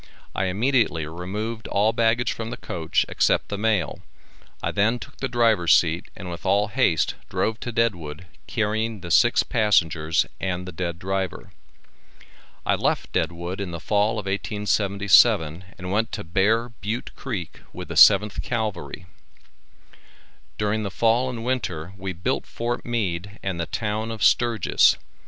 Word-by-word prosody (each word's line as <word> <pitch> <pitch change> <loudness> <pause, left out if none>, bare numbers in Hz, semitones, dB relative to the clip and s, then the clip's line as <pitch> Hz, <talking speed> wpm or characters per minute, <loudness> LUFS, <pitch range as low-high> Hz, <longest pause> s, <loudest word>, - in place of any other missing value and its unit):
I 95 - -1
immediately 105 - +1
removed 105 +8 -5
all 105 +3 +2
baggage 115 +1 +2
from 115 0 -5
the 120 - -6
coach 80 -1 -1
except - - +1
the 100 - -3
mail. 105 -8 0 0.6
I - - 0
then 110 +4 +2
took 140 +3 -12
the 135 - -2
driver's 115 -8 +4
seat 85 0 +1
and 95 - -8
with 85 - -8
all 100 +2 +2
haste 105 - +2 0.2
drove 110 +1 -1
to 120 - -5
Deadwood, 90 -9 -1 0.2
carrying 110 -1 -1
the 85 -1 -6
six - - +5
passengers 80 -7 +2
and 90 -1 -2
the - - -5
dead 85 0 -4
driver. 95 0 -3 1.1
I - - +3
left - - -1
Deadwood 85 +3 -2
in 100 - -3
the 85 -1 -6
fall 105 +1 +1
of 105 -3 -4
1877, 100 -4 +2
and 90 0 -6
went 110 +4 0
to 105 - -4
Bear 105 +8 +1
Butte 115 +2 -5
Creek 100 - -6
with - - -8
the - - -4
7th 105 0 +6
Cavalry. 110 -5 -4 1.5
During 105 +1 0
the 100 - -3
fall 115 +5 +2
and 120 -2 -5
winter 95 -9 -2
we 95 -1 -5
built 90 0 -2
Fort 120 +1 -3
Meade 100 -4 -3
and 95 -3 -3
the 85 - -2
town 110 0 -2
of 115 -2 -4
Sturgis. 115 -5 +4
105 Hz, 150 wpm, -24 LUFS, 90-115 Hz, 1.5 s, 7th